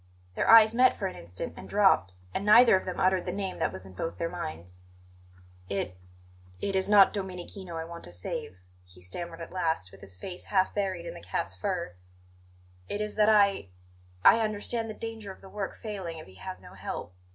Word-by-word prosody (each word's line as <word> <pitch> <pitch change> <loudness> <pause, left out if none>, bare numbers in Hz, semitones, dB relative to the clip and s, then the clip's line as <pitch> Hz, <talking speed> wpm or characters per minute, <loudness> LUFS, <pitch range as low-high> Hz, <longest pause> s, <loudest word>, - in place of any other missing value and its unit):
Their - - 0
eyes 225 -1 +9
met 255 +2 +5
for 200 - -3
an 185 - -3
instant, 90 +2 -6
and - - -10
dropped; 190 - +3 0.2
and - - -2
neither 225 +2 +8
of 185 - -1
them 185 -1 -4
uttered 185 -1 +3
the - - 0
name 190 0 -4
that - - +1
was 95 - -7
in 95 - -12
both 165 - -4
their 165 0 -2
minds. 90 - -6 0.9
"It 100 -2 -2 0.6
it 195 - -2
is 190 +1 +2
not 205 -2 +7
Domenichino 185 -2 -6
I 160 - -3
want 170 0 -9
to 85 - -11
save," 90 +1 -5 0.3
he 90 0 -19
stammered 165 - -7
at 165 - -8
last, 160 - -1
with 95 - -15
his 95 -2 -9
face 180 - -8
half 190 -2 +2
buried 195 -2 -2
in - - -5
the - - -10
cat's - - -3
fur; 185 - -3 1.0
"it 205 - -2
is 210 0 -2
that 215 0 +4
I 200 - +4 0.6
I 230 - +8
understand 220 +1 -1
the 215 - -6
danger 225 -3 -6
of - - -13
the 195 - -12
work 200 -1 -5
failing 190 -7 -5
if 155 - -9
he 95 - -16
has 90 0 -7
no - - -12
help." 90 - -6
185 Hz, 210 wpm, -29 LUFS, -, 1.0 s, eyes